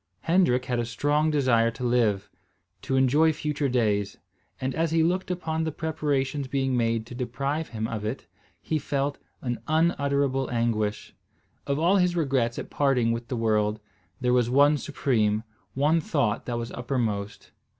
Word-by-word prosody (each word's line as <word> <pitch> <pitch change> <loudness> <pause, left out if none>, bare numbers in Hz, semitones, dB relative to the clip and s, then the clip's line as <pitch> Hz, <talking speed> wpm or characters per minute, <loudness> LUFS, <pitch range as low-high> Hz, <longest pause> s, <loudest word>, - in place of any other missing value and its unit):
Hendrik 165 -7 +2
had 125 -2 -1
a 120 - 0
strong 145 +7 +1
desire 125 -6 +3
to 115 +2 -7
live, 110 -5 +1 0.5
to 135 - -2
enjoy 140 +5 +4
future 150 -2 -2
days; 105 -5 0 0.4
and, 130 0 -2
as 165 +1 0
he 165 0 +2
looked 180 +3 0
upon 160 -3 -2
the 160 - -1
preparations 145 -3 -1
being 135 0 0
made 115 -2 0
to 120 - -10
deprive 135 +5 -2
him 110 -1 -3
of 110 -2 -4
it, 110 +5 -4 0.4
he 155 - -1
felt 140 0 -2 0.2
an 120 -2 -2
unutterable 140 -4 +1
anguish. 115 -3 -1 0.5
Of 140 0 0
all 175 +6 +3
his 180 -2 +2
regrets 135 -7 0
at - - -6
parting 130 -5 +2
with 115 +1 -3
the 125 - -3
world, 105 -1 +1 0.4
there 125 -1 +1
was 120 -2 +3
one 145 +3 +4
supreme, 110 -7 0 0.3
one 150 +5 +3
thought 125 -8 -1
that 120 -1 -2
was 115 0 -4
uppermost. 115 -5 -3
130 Hz, 160 wpm, -26 LUFS, 115-150 Hz, 0.5 s, enjoy